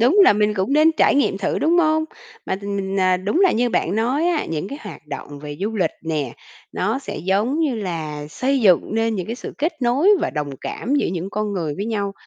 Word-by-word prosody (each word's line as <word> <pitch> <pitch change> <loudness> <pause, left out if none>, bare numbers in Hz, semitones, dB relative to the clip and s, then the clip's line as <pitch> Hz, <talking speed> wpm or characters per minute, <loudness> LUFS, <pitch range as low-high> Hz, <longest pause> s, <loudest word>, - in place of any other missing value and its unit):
Đúng 250 - +4
là - - +7
mình 210 0 +1
cũng 195 +6 -1
nên 310 +2 +5
trải - - +4
nghiệm 275 -8 +2
thử, 200 - -1
đúng 340 +3 +3
hông? 315 -1 +3 0.4
Mà - - -1
t 200 - -14
mình, 200 -1 -3
ờ, 185 -1 +3
đúng 200 - -1
là 380 -2 +5
như 245 +2 +1
bạn 175 - 0
nói 255 +9 +1
á, 330 -4 0
những 160 +3 -3
cái 280 - -7
hoạt 155 - -10
động 145 0 -7
về 145 0 -7
du 220 +2 -2
lịch 180 -5 +1
nè, 150 -6 -2 0.4
nó - - -1
sẽ, - - -7
giống 200 - 0
như 290 -6 +1
là, 160 -7 -4
xây 265 - 0
dựng 190 0 +3
nên 225 0 +1
những 185 -4 -3
cái 230 - -3
sự - - -7
kết 315 +5 0
nối 255 +9 +3
và 340 - 0
đồng 150 -2 -3
cảm 260 +6 -3
giữa 290 - +2
những 180 +2 -4
con 210 0 -2
người 160 -6 -2
với 200 - -3
nhau. 205 -3 -2
205 Hz, 245 wpm, -21 LUFS, 180-265 Hz, 0.4 s, là